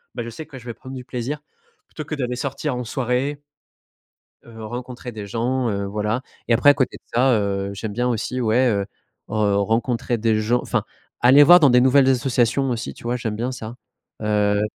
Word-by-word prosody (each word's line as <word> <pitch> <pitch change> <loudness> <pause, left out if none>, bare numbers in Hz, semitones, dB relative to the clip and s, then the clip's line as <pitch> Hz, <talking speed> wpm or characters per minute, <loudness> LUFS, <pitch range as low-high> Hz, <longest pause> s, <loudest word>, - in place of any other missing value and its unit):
bah, 120 - -3
je 115 - -6
sais 155 +7 -8
que 135 -4 -11
je 120 - -16
vais 120 - -5
prendre 130 +3 -10
du 125 -1 -8
plaisir 125 +4 -4 0.5
plutôt 155 - -7
que 155 - -4
d'aller 125 -3 -2
sortir 140 +1 -3
en 125 - -3
soirée 130 +4 -2 1.0
heu, 115 -1 -12
rencontrer 125 +2 -7
des 105 -2 -7
gens, 120 +3 -1
heu, 100 -1 -2
voilà, 105 +4 -1 0.3
et 120 - +3
après, 145 +5 +5
à - - +2
côté 130 -3 -1
de - - -34
ça, 130 +2 +4
heu, 100 -2 -1
j'aime 105 +1 -5
bien 125 +2 0
aussi, 125 +2 -2
ouais, 120 +3 +3
heu, 100 -3 +1 0.4
heu, 105 -2 +1
rencontrer 115 +3 0
des 110 -1 +1
gens, 120 +3 +1
enfin - - -1 0.4
aller 135 +4 +8
voir 175 +2 +8
dans 140 - +6
des 125 0 +5
nouvelles 130 +1 +5
associations 130 +1 +1
aussi, 120 -1 -3
tu - - -16
vois, 120 +1 -1
j'aime 110 -3 -3
bien 120 +3 -2
ça 115 -1 -7 0.5
heu 105 -1 +1
120 Hz, 205 wpm, -22 LUFS, 110-130 Hz, 1.0 s, aller